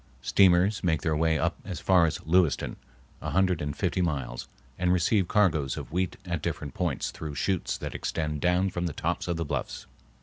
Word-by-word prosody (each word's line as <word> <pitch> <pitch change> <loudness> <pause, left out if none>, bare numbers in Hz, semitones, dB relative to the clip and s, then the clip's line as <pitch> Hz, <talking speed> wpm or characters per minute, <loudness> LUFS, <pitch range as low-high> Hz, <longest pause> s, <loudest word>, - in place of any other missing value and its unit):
Steamers 95 +2 +4
make 80 -4 +1
their 80 -1 +1
way 80 +1 +2
up - - 0
as 95 -4 -5
far 90 -3 +4
as 80 - -4
Lewiston, 85 -2 +2 0.5
a - - -3
hundred 95 -2 +2
and 75 -1 -3
fifty 95 - 0
miles, 70 -8 -2 0.3
and 90 0 +2
receive 90 +2 +2
cargoes 80 -11 +2
of - - -7
wheat 90 +1 -1
at 85 -4 -2
different 70 -3 -4
points 85 -8 -1
through 75 -2 -6
chutes 95 +2 -1
that - - -6
extend 75 -2 -3
down 90 +2 +2
from 90 0 -2
the 80 - -4
tops - - -2
of 85 -1 -1
the 85 - -2
bluffs. - - -4
85 Hz, 195 wpm, -28 LUFS, 75-90 Hz, 0.5 s, Steamers